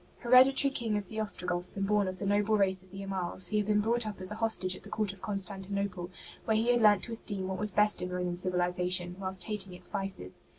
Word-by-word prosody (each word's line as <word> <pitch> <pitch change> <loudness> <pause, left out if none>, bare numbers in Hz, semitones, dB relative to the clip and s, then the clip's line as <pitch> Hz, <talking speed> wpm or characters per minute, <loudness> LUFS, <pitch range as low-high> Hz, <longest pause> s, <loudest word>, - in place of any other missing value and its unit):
'' - - -31
Hereditary 260 +3 +5
King 225 -5 -2
of 200 -3 -6
the 220 - -6
Ostrogoths, 180 -3 0
and 195 - -1
born 205 -1 +1
of 185 0 -4
the 200 - -5
noble 205 +2 +1
race 190 -2 +2
of 185 - -18
the 195 +1 -9
Amals, 190 -1 0
he 215 - -1
had 210 -1 -1
been 210 -1 +2
brought 230 +1 +1
up 210 -3 -7
as 185 +1 +1
a - - -5
hostage 190 -5 +3
at - - -13
the - - -11
court 210 -3 -2
of 195 - -17
Constantinople, 195 -2 -3 0.4
where 220 -1 +1
he 230 +2 +2
had 240 -1 +1
learnt 205 -3 +4
to 235 - -3
esteem 205 -4 -1
what 190 0 -4
was 210 -1 -1
best 210 +1 +2
in 180 - -4
Roman 180 -1 -3
civilization, 180 0 0
whilst 190 -1 -4
hating 195 -2 -3
its - - -5
vices. 195 - -2
195 Hz, 250 wpm, -30 LUFS, 185-210 Hz, 0.4 s, Hereditary